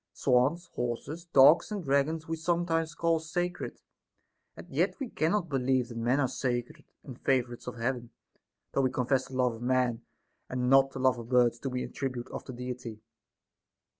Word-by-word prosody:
Swans, 140 +7 +2
horses, 125 +8 -4
dogs, 150 +3 +6
and 205 -3 -3
dragons 150 +3 +1
we 165 - -1
sometimes 165 -1 0
call 165 -1 +2
sacred; 175 +3 -3 0.8
and - - -10
yet - - 0
we 270 - -3
cannot 175 +2 0
believe 130 -3 +1
that 115 - -7
men 120 +4 +2
are 135 - +3
sacred 120 -1 -3 0.2
and 130 -3 -10
favorites 125 -3 0
of 125 - -5
Heaven, 120 0 -2 0.6
though - - +1
Ave 130 - +2
confess 130 +1 +1
the 130 - -9
love 125 -2 +2
of 115 - -10
man 125 -2 +1 0.5
and 125 0 -1
not 135 0 +6
the 135 - -8
love 130 -1 +3
of 115 0 -9
birds 120 -2 +3
to 135 - -3
be 125 0 -2
an - - -6
attribute 130 -3 -4
of - - -6
the 130 - -7
Deity. 125 -2 -6
130 Hz, 180 wpm, -29 LUFS, 125-160 Hz, 0.8 s, dogs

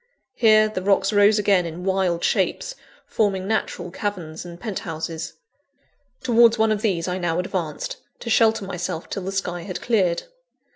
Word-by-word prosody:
Here, 215 -3 +5
the 215 -3 -4
rocks 195 +1 +2
rose 205 +1 +5
again 200 -3 +3
in 165 +2 -7
wild 190 -3 0
shapes, - - 0 0.3
forming 195 -3 0
natural 180 -5 -2
caverns 175 -6 -4
and 175 -1 -10
penthouses. 165 -6 -5 0.9
Towards 235 -2 +5
one 220 0 +3
of 210 -1 0
these 190 -7 0
I 180 +1 -2
now 170 -2 -1
advanced, 180 -4 -3 0.2
to 235 - -5
shelter 225 -2 +3
myself 180 -2 -4
till 195 - -3
the 195 - -2
sky 180 -3 -2
had 185 +1 -5
cleared. 190 -8 +1
190 Hz, 155 wpm, -23 LUFS, 175-215 Hz, 0.9 s, Here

